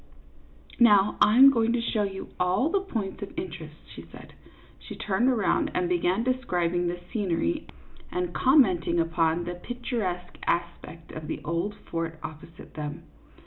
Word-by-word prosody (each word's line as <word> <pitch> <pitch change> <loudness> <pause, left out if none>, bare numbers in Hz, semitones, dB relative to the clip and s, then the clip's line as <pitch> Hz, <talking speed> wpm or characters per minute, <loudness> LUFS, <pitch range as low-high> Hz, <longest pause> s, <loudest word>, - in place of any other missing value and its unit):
" - - -24
Now 205 0 +4
I 210 +3 +5
am 270 +1 +10
going 230 -2 +1
to 245 - +1
show 230 -2 0
you 195 -1 -4
all 185 - +2
the 395 +3 +2
points 220 - -4
of 200 - -8
interest," 160 -4 -6 0.2
she - - -9
said. - - -13 0.5
She - - -9
turned 210 +6 +1
around 225 -7 +1
and 180 - +1
began 180 +4 +1
describing 180 -9 0
the 175 0 -3
scenery 175 - -1 0.4
and 180 -1 -2
commenting 185 - +3
upon 165 0 +1
the 175 +1 -4
picturesque 195 -4 -4
aspect 170 -1 -3
of 155 -1 -7
the - - -4
old 170 +6 -2
fort 165 -4 -5
opposite 160 +1 -10
them. 150 -1 -6
180 Hz, 155 wpm, -27 LUFS, 170-225 Hz, 0.5 s, am